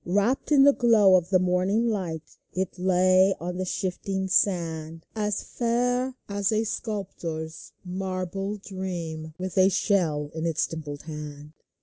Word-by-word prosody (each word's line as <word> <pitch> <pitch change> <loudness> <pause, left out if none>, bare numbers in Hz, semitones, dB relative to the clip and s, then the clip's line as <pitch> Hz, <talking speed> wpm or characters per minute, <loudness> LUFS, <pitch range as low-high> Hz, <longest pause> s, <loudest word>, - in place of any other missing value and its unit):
Wrapped 205 - 0
in 280 -2 +7
the 285 0 +7
glow 220 -7 +5
of 180 -2 +2
the 190 - +5
morning 185 +5 +1
light, 175 -8 -3 0.2
It 185 0 -3
lay 185 +1 +4
on 180 +2 -4
the 185 - -2
shifting 190 +1 -2
sand, 165 -4 0
As 210 -2 -1
fair 245 +2 0
as 200 +1 0
a 220 0 +2
sculptor's 170 -8 -5
marble 190 +2 -3
dream, 170 -6 -5
With 185 +1 -2
a 185 +1 +6
shell 170 -7 +1
in 160 +1 -2
its 160 -2 +1
dimpled 150 -3 -7
hand. 150 -1 -8
185 Hz, 140 wpm, -26 LUFS, 165-205 Hz, 0.2 s, in